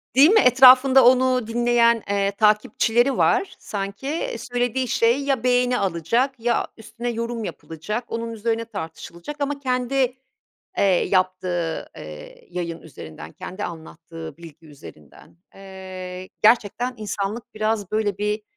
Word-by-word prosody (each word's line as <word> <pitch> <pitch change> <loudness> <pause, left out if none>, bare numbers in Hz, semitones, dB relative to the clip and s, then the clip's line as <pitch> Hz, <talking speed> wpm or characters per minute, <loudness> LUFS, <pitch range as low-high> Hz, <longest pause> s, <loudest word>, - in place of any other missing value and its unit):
Değil 280 +5 +8
mi, 435 +2 +6
etrafında 260 - +7
onu 255 -2 +4
dinleyen, 235 -1 +2
eee, 200 0 +1
takipçileri 220 +4 +2
var 390 -1 +2
sanki. 200 +5 -5
Eee, 485 +12 -3
söylediği 245 0 -2
şey 235 +5 +2
ya 270 -4 0
beğeni 250 0 +2
alacak 230 - 0
ya 235 +1 0
üstüne 235 +2 -6
yorum 230 0 -3
yapılacak, 205 +7 -5
onun 230 0 -4
üzerine 230 +1 -2
tartışılacak 170 - -8
ama 285 0 -2
kendi, 255 0 0 0.6
eee, - - +3
yaptığı, 185 -3 0
eee, 75 -1 -11
yayın 170 -2 -5
üzerinden, 80 - -11
kendi 190 +3 -7
anlattığı 165 -1 -9
bilgi 165 -1 -14
üzerinden. 85 - -15 0.2
Eee, 185 -1 -9
gerçekten 235 +3 +3
insanlık 210 +1 -5
biraz 215 -2 -1
böyle 210 -2 -1
bir, 210 +1 -1
220 Hz, 125 wpm, -22 LUFS, 185-250 Hz, 0.6 s, Değil